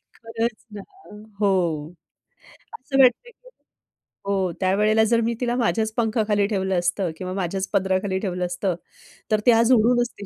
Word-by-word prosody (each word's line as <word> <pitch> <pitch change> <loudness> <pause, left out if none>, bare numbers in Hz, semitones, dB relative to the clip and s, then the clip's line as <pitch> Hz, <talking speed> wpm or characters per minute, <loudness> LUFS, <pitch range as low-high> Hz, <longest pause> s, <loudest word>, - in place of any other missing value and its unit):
खरंच 230 0 -3 0.2
ना 205 - -7 0.6
हो, 200 -2 +3 1.3
असं 270 +1 -2
वाटतं 365 - +2 1.0
हो 200 - +1 0.3
त्यावेळेला 210 +4 +3
जर 230 +1 +2
मी 230 +1 0
तिला 240 -1 0
माझ्याच 225 -2 0
पंखाखाली 215 -3 +1
ठेवलं 190 -3 -1
असतं 175 0 -1
किंवा 185 0 -5
माझ्याच 190 0 -3
पदराखाली 190 0 0
ठेवलं 180 -3 -3
असतं, 180 +1 -2 0.6
तर 215 - +3
ती 245 - +7
आज 230 +2 +4
उडू 235 +1 +4
नसती 235 -4 -5
210 Hz, 140 wpm, -23 LUFS, 190-230 Hz, 1.3 s, ती